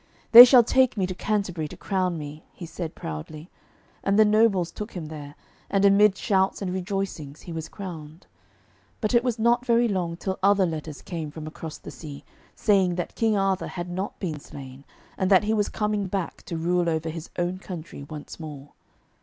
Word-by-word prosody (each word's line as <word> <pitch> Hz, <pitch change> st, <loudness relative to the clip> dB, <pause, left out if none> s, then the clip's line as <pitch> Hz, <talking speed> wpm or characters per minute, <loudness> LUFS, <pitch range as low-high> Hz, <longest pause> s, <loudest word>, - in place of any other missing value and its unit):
'They 240 Hz, +1 st, +14 dB
shall 245 Hz, -1 st, +7 dB
take 260 Hz, 0 st, +2 dB
me 190 Hz, -, +1 dB
to 185 Hz, -, -4 dB
Canterbury 185 Hz, -5 st, -2 dB
to -, -, -11 dB
crown 185 Hz, -3 st, -1 dB
me,' 150 Hz, 0 st, -8 dB
he 175 Hz, -, -8 dB
said 165 Hz, 0 st, -6 dB
proudly. 150 Hz, -, -7 dB, 0.5 s
And 195 Hz, +1 st, +2 dB
the 215 Hz, -, +7 dB
nobles 210 Hz, -5 st, +3 dB
took 210 Hz, +1 st, -7 dB
him 165 Hz, -4 st, -6 dB
there, 145 Hz, -2 st, -9 dB, 0.3 s
and 195 Hz, 0 st, +2 dB
amid 200 Hz, 0 st, +5 dB
shouts 190 Hz, -1 st, +1 dB
and 185 Hz, -3 st, -3 dB
rejoicings 185 Hz, -6 st, -4 dB
he 175 Hz, -, -9 dB
was 160 Hz, -1 st, -5 dB
crowned. 165 Hz, -4 st, -9 dB, 0.7 s
But 215 Hz, 0 st, -1 dB
it 235 Hz, 0 st, +4 dB
was 245 Hz, -3 st, -1 dB
not 235 Hz, +2 st, +2 dB
very 240 Hz, -1 st, +3 dB
long 175 Hz, -5 st, -2 dB
till 190 Hz, +1 st, -4 dB
other 200 Hz, 0 st, +4 dB
letters 155 Hz, -3 st, -5 dB
came 165 Hz, -4 st, -5 dB
from 155 Hz, +1 st, -8 dB
across 155 Hz, 0 st, -7 dB
the -, -, -10 dB
sea, 145 Hz, -3 st, -10 dB, 0.3 s
saying 190 Hz, -4 st, +2 dB
that 175 Hz, -, -4 dB
King 220 Hz, -2 st, +1 dB
Arthur 195 Hz, -1 st, 0 dB
had 175 Hz, 0 st, -6 dB
not 190 Hz, +3 st, -4 dB
been 160 Hz, -6 st, -3 dB
slain, 135 Hz, -1 st, -11 dB, 0.3 s
and 190 Hz, -, +1 dB
that 190 Hz, -1 st, +6 dB
he 215 Hz, +1 st, 0 dB
was 210 Hz, -2 st, +1 dB
coming 210 Hz, -2 st, -1 dB
back 190 Hz, -2 st, -4 dB
to 170 Hz, -, -3 dB
rule 175 Hz, +1 st, +1 dB
over 160 Hz, 0 st, -1 dB
his 165 Hz, +1 st, -7 dB
own 175 Hz, +1 st, -1 dB
country 170 Hz, -6 st, -8 dB
once 150 Hz, +3 st, -9 dB
more. 145 Hz, -3 st, -9 dB
180 Hz, 195 wpm, -25 LUFS, 160-205 Hz, 0.7 s, They